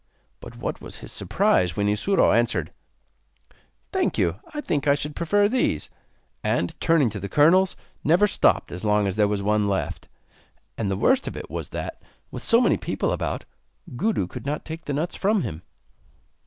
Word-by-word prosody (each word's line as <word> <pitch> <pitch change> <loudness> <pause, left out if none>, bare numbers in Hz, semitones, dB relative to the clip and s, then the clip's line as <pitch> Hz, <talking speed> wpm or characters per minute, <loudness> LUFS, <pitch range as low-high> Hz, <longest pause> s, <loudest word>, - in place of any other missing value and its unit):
But - - -11
what - - -4
was - - -7
his - - -9
surprise 90 -3 +1
when 100 0 +1
Isuro 105 - +3
answered: 110 -9 0 1.2
'Thank - - 0
you; 85 +3 +1
I 300 - -5
think 150 - -1
I 140 - +5
should 150 +1 -5
prefer 205 +5 +2
these.' 225 - 0 0.5
And, 85 - 0
turning 155 -8 +3
to 100 - -5
the 100 +1 -5
kernels, 175 - +4 0.3
never 175 +6 +4
stopped 205 - +2
as 90 +3 -5
long 105 -1 +2
as 95 -2 -1
there 105 -1 +3
was 100 -1 -1
one 105 0 +2
left. 95 - -3 0.7
And 105 -3 -2
the 95 - -1
worst 260 - +2
of - - -5
it - - -8
was - - -5
that, - - -6 0.3
with - - -6
so 230 - +4
many 240 - +3
people - - -2
about, - - -2 0.5
Gudu 205 - 0
could 115 - -8
not 150 +2 -3
take 160 +1 -7
the 145 - -2
nuts 155 +5 -2
from 205 0 +1
him. 80 +1 -5
140 Hz, 180 wpm, -24 LUFS, -, 1.2 s, I